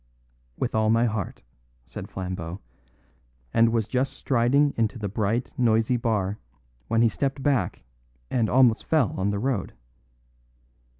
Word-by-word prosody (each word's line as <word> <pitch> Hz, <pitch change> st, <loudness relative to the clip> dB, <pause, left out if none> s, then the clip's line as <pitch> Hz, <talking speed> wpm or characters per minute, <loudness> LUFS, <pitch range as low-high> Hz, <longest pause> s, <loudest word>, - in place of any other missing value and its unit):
"With -, -, -2 dB
all 110 Hz, 0 st, +2 dB
my 115 Hz, +2 st, +4 dB
heart," 110 Hz, -5 st, -3 dB, 0.4 s
said -, -, -8 dB
Flambeau, 90 Hz, -1 st, -5 dB, 0.9 s
and 115 Hz, 0 st, +5 dB
was 115 Hz, -2 st, 0 dB
just 130 Hz, +2 st, 0 dB
striding 135 Hz, +3 st, +2 dB
into 115 Hz, +1 st, 0 dB
the 105 Hz, -2 st, -3 dB
bright, 110 Hz, +5 st, -1 dB
noisy 115 Hz, 0 st, +3 dB
bar 105 Hz, -4 st, -1 dB, 0.5 s
when 115 Hz, +1 st, +3 dB
he -, -, +6 dB
stepped 135 Hz, +3 st, -2 dB
back 130 Hz, -11 st, 0 dB, 0.5 s
and 115 Hz, -4 st, +1 dB
almost 125 Hz, -3 st, +4 dB
fell 155 Hz, -9 st, +2 dB
on 95 Hz, +2 st, 0 dB
the 100 Hz, -, -1 dB
road. 115 Hz, -3 st, -2 dB
115 Hz, 135 wpm, -25 LUFS, 105-125 Hz, 0.9 s, he